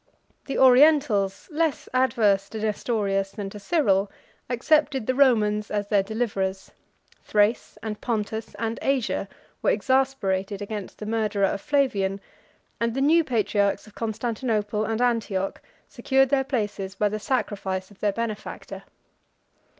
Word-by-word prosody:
The 275 Hz, -, -3 dB
Orientals, 255 Hz, -7 st, +4 dB
less 315 Hz, -1 st, -1 dB
adverse 220 Hz, -6 st, +2 dB
to 220 Hz, -, -6 dB
Nestorius 205 Hz, -2 st, -1 dB
than 200 Hz, -3 st, -5 dB
to 210 Hz, -, -9 dB
Cyril, 205 Hz, -, +1 dB, 0.4 s
accepted 270 Hz, 0 st, +2 dB
the 255 Hz, -, +1 dB
Romans 215 Hz, -6 st, +3 dB
as 205 Hz, -1 st, -2 dB
their 205 Hz, -2 st, +4 dB
deliverers: 195 Hz, -3 st, -3 dB, 0.5 s
Thrace, 210 Hz, +2 st, +1 dB
and 215 Hz, -1 st, -5 dB
Pontus, 220 Hz, -1 st, -3 dB
and 225 Hz, 0 st, -3 dB
Asia, 270 Hz, -4 st, 0 dB, 0.3 s
were -, -, +2 dB
exasperated 260 Hz, -, 0 dB
against 205 Hz, -1 st, -6 dB
the 210 Hz, -, -7 dB
murderer 215 Hz, -2 st, +1 dB
of 195 Hz, -, -2 dB
Flavian, 215 Hz, -10 st, +1 dB, 0.6 s
and 230 Hz, 0 st, 0 dB
the -, -, -1 dB
new 320 Hz, +5 st, +4 dB
patriarchs 205 Hz, -6 st, 0 dB
of 215 Hz, -, -16 dB
Constantinople 220 Hz, -2 st, -2 dB
and 225 Hz, +2 st, 0 dB
Antioch 215 Hz, -6 st, -1 dB, 0.3 s
secured 270 Hz, -1 st, +2 dB
their 270 Hz, -1 st, +2 dB
places 205 Hz, -6 st, -3 dB
by 210 Hz, +1 st, +2 dB
the 215 Hz, +1 st, -3 dB
sacrifice 200 Hz, -5 st, -2 dB
of 205 Hz, -, -18 dB
their 210 Hz, -, +1 dB
benefactor. 215 Hz, 0 st, -5 dB
215 Hz, 135 wpm, -25 LUFS, 200-255 Hz, 0.6 s, Orientals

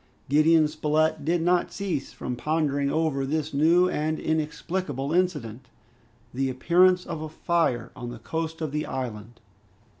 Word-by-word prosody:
Gideon 155 Hz, +2 st, +5 dB
Spilett 155 Hz, 0 st, 0 dB
did 165 Hz, +2 st, +1 dB
not 175 Hz, 0 st, +2 dB
cease 180 Hz, -9 st, -3 dB
from 125 Hz, -, -5 dB
pondering 145 Hz, -1 st, 0 dB
over 155 Hz, -3 st, 0 dB
this 150 Hz, +2 st, -2 dB
new 165 Hz, +5 st, +4 dB
and 155 Hz, -2 st, -1 dB
inexplicable 155 Hz, -2 st, -2 dB
incident, 140 Hz, -10 st, -1 dB, 0.7 s
the 135 Hz, +1 st, 0 dB
appearance 180 Hz, +7 st, +3 dB
of 155 Hz, -, -5 dB
a 155 Hz, -, -5 dB
fire 150 Hz, -8 st, 0 dB
on 120 Hz, -, -6 dB
the 120 Hz, -, -7 dB
coast 160 Hz, +7 st, -4 dB
of 155 Hz, -3 st, -2 dB
the 150 Hz, +1 st, -2 dB
island. 115 Hz, -3 st, -6 dB
155 Hz, 145 wpm, -26 LUFS, 135-165 Hz, 0.7 s, Gideon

